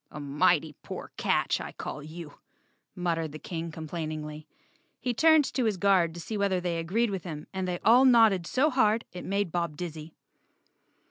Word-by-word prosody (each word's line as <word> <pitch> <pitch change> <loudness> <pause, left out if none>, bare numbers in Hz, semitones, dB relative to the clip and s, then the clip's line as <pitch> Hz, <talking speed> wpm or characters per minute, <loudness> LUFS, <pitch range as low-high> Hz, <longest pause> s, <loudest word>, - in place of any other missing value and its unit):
"A 150 - -8
mighty 150 +2 +2
poor - - -8
catch, - - +1
I - - -7
call 150 - -6
you," 155 0 -10 0.6
muttered 165 -4 -2
the - - -6
King 165 +1 -5
complainingly. 155 -1 -6 0.5
He 245 - -1
turned 315 +3 +5
to 255 - 0
his 215 -4 0
guard 185 -4 +3
to - - -7
see 215 +5 -5
whether 195 -2 +1
they 175 -2 -2
agreed 205 +7 0
with 190 -3 -4
him 155 -4 -6
and 190 -1 -2
they 180 -1 -1
all 245 +4 +7
nodded 225 -9 +5
so 295 +4 +2
hard 225 -3 +2
it 180 - -7
made 200 -2 -1
Bob 170 -3 -2
dizzy. 160 -2 -7
175 Hz, 180 wpm, -28 LUFS, 160-210 Hz, 0.6 s, all